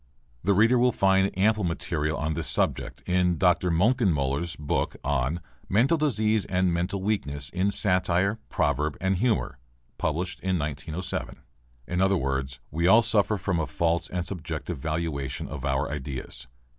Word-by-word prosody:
(The 100 +2 +3
reader 115 +5 +5
will 125 +1 +4
find 95 -2 +3
ample 105 +2 +3
material 80 -2 -1
on 75 +1 -1
this - - -3
subject - - -1
in 90 -1 +2
Dr. 90 0 +3
Moenkenmöller's 85 - +1
book 75 -1 -1
on 70 +5 0 0.3
'mental 125 - +4
disease 110 -9 +1
and 90 -2 +1
mental 90 +3 -1
weakness 75 -9 -2
in 95 +2 +1
satire, 100 0 +1
proverb, 75 0 0
and 95 0 +1
humour,' 110 - 0 0.4
published 85 +4 -2
in 95 -1 0
1907.) 75 +3 -4 0.4
In 90 +5 -1
other 95 0 +3
words: 65 -2 -2
We 85 +3 +1
all 110 +5 +7
suffer 105 -1 +2
from 90 -2 -1
a 75 - -1
false 85 +5 0
and 90 -1 -2
subjective 80 -3 -4
valuation 75 -4 -3
of 75 -2 -6
our 70 +1 0
ideas. 65 -4 -6
90 Hz, 150 wpm, -26 LUFS, 75-100 Hz, 0.4 s, all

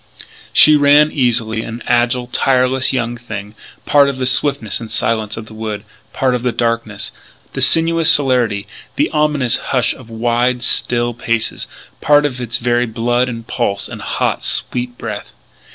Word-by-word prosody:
She 155 - +7
ran 145 +1 +5
easily, 115 -4 0
an 115 +1 -7
agile, 120 +1 +1
tireless 130 +1 +2
young 120 -2 -2
thing, 105 -3 -8 0.3
part 140 -1 +4
of 140 - -4
the 130 - -2
swiftness 125 -5 0
and 115 -2 -8
silence 110 -1 -1
of 110 - -7
the 110 - -14
woods 110 -2 -5 0.3
part 130 -3 0
of 125 - -1
the 125 0 0
darkness, 115 -3 -2 0.4
the - - -4
sinuous 165 0 +4
celerity, 125 -9 +2 0.3
the 295 +2 0
ominous 150 -5 +1
hush 125 -3 0
of 125 -3 -14
wide, 120 +2 0
still 120 -1 0
places 115 -1 -2 0.3
part 145 0 +4
of 125 -3 -3
its 120 -1 -2
very 120 0 0
blood 120 +3 0
and 115 -2 -7
pulse 100 -2 -2
and - - -9
hot, - - -2
sweet 125 0 -1
breath. 105 -3 -7
120 Hz, 160 wpm, -16 LUFS, 115-130 Hz, 0.4 s, She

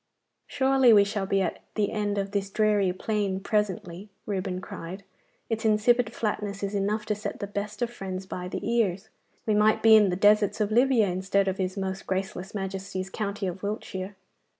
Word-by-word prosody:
'Surely 265 -3 +4
we 205 -2 +7
shall 200 -1 -2
be 195 0 +2
at 170 - -3
the 210 -2 +1
end 205 -1 -1
of 195 0 -2
this 200 -1 -1
dreary 210 -2 +2
plain 200 0 -1
presently,' 195 -2 -2 0.2
Reuben 190 -2 -2
cried. 185 +1 -8 0.4
'Its 225 0 -2
insipid 220 +2 +3
flatness 205 -3 -3
is 200 +1 -2
enough 205 +2 -1
to 210 - 0
set 210 0 -5
the - - -3
best 205 +2 -4
of 240 - -2
friends 190 -4 -6
by 180 -1 -5
the 180 - -4
ears. 220 -4 0 0.4
We 215 - +2
might 210 +1 +3
be 225 -1 +8
in 210 -2 +6
the 180 - 0
deserts 205 +2 +4
of 210 0 0
Libya 245 -1 +4
instead 195 +1 0
of 190 0 -1
his 185 +1 -2
most 190 0 -4
graceless 190 +1 -3
Majesty's 190 -1 -4
county 200 -1 -3
of 185 0 -4
Wiltshire. 200 -2 -4
200 Hz, 185 wpm, -27 LUFS, 190-215 Hz, 0.4 s, be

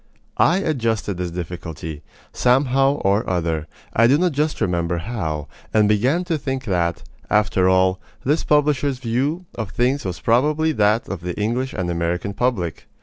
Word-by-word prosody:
I 175 - +5
adjusted 115 - -1
this 90 -1 -2
difficulty, 80 -3 -6 0.3
somehow 135 +2 +3
or 100 -6 +1
other 80 -3 -1 0.3
I 115 +1 +5
do 135 +4 +5
not 180 +2 +2
just 150 +2 -1
remember 85 -1 0
how 80 -7 -3 0.3
and 105 -1 +5
began 125 - +2
to 170 -3 -1
think 135 -1 -3
that, 85 -5 0 0.3
after 95 -3 +3
all, 95 0 +3 0.3
this 150 +5 +2
publisher's 145 -2 +2
view 135 +8 -1
of 110 -4 -4
things 125 +6 0
was 90 -3 -4
probably 150 +7 +2
that 105 -3 +2
of 95 -2 -5
the 90 +2 -5
English 120 +5 -1
and 90 -3 -2
American 85 +3 -2
public. 100 -8 -1
110 Hz, 155 wpm, -21 LUFS, 90-135 Hz, 0.3 s, I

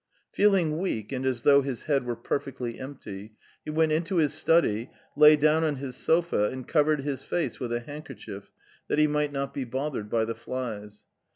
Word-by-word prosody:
Feeling 185 -7 +3
weak 115 - -3
and 130 0 -2
as 125 -3 -1
though 140 -1 +6
his 135 -3 -4
head 140 -4 +1
were 120 - -1
perfectly 120 0 -4
empty, 110 -6 -8 0.3
he - - -7
went 160 +1 +2
into 165 +4 0
his 155 -3 +2
study, 155 -8 +2 0.3
lay 150 +1 +8
down 155 +2 +3
on 155 -2 +1
his 130 -2 -6
sofa, 165 -10 +2
and 130 -1 -7
covered 150 -2 +2
his 140 -1 -3
face 175 - -2
with 125 -3 -4
a 120 0 -1
handkerchief 130 -8 -9 0.4
that - - 0
he 155 - +5
might 150 -1 0
not 140 -1 -3
be 140 - -3
bothered 130 -3 -4
by 115 0 +1
the 115 - -3
flies. 110 -5 -6
140 Hz, 190 wpm, -27 LUFS, 120-155 Hz, 0.4 s, lay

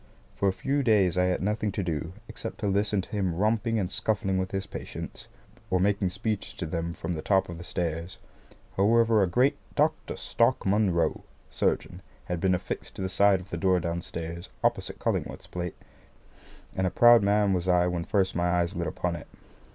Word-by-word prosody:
For 100 - +2
a - - +2
few 140 +9 -1
days 105 -8 +3
I 90 0 +3
had 90 0 0
nothing 105 +1 0
to 100 - -2
do, 80 0 -3
except 115 0 -7
to 105 - 0
listen 100 0 +1
to - - -12
him 95 -5 -1
romping 110 +4 +1
and 95 -3 -1
scuffling 100 -4 0
with 95 0 -2
his 95 0 -3
patients, - - -7 0.4
or 90 - +2
making 100 0 +2
speeches 100 +2 -3
to 85 - -4
them 85 +1 -3
from 90 - -3
the 80 - -4
top 95 +2 +2
of 85 -1 -7
the - - -7
stairs. 85 0 -3 0.6
However, 110 +2 +4
a 95 - +3
great 125 +10 +2 0.2
"Dr. 155 +1 +1
Stark 115 +2 +1
Munro, 95 -5 +1 0.3
Surgeon," - - -1 0.2
has 90 -1 -3
been 95 +1 +3
affixed 90 - -5
to - - -4
the 95 - -1
side 95 0 +4
of 95 - -15
the 85 - -2
door 95 +1 +3
downstairs, 85 0 -5
opposite - - +1
Cullingworth's - - -2
plate; 90 -1 -5 1.0
and 95 0 +1
a - - +1
proud 120 +3 +7
man 100 0 +3
was 90 0 -1
I 90 -1 +4
when 90 -1 -1
first 95 +1 +1
my 85 0 +1
eyes 90 +1 +1
lit 85 -1 -2
upon 85 +2 -2
it. 75 - -9
95 Hz, 195 wpm, -27 LUFS, 90-105 Hz, 1.0 s, proud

